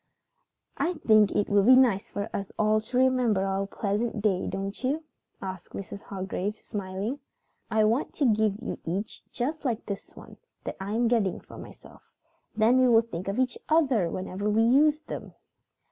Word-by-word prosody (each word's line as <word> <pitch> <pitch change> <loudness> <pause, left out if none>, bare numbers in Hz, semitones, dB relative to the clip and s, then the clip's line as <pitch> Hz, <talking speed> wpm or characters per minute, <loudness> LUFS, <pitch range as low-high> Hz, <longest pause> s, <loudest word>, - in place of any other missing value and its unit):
"I 350 - 0
think 215 - +4
it 205 - +1
would 200 +1 +3
be 255 - +9
nice 240 -7 +3
for 205 +1 -4
us 195 -1 -4
all 215 0 +3
to 245 +3 -4
remember 250 -6 +3
our 195 0 -1
pleasant 210 +3 -2
day, 200 -3 +1
don't 195 +4 -4
you?" 290 +5 0 0.4
asked 185 -2 -7
Mrs. 200 +1 -7
Hargrave, 195 +1 -4
smiling. 200 +7 -4 0.5
"I 220 -1 +3
want 230 +7 +1
to 285 - +1
give 215 -3 +2
you - - -4
each 190 +6 -4
one - - -42
just 295 +6 -3
like 240 -5 -2
this 200 -2 -7
one - - -13 0.3
that - - -5
I 195 +2 -4
am 235 +1 +2
getting 225 -6 +1
for - - -13
myself. - - -14 0.5
Then 230 +4 +4
we 255 - +5
will 230 -1 +5
think 185 -5 -7
of 195 - -2
each 255 -1 0
other 270 - +3
whenever 190 +3 -3
we 220 +2 +3
use 295 +6 +4
them." - - -8
215 Hz, 180 wpm, -27 LUFS, 195-250 Hz, 0.5 s, be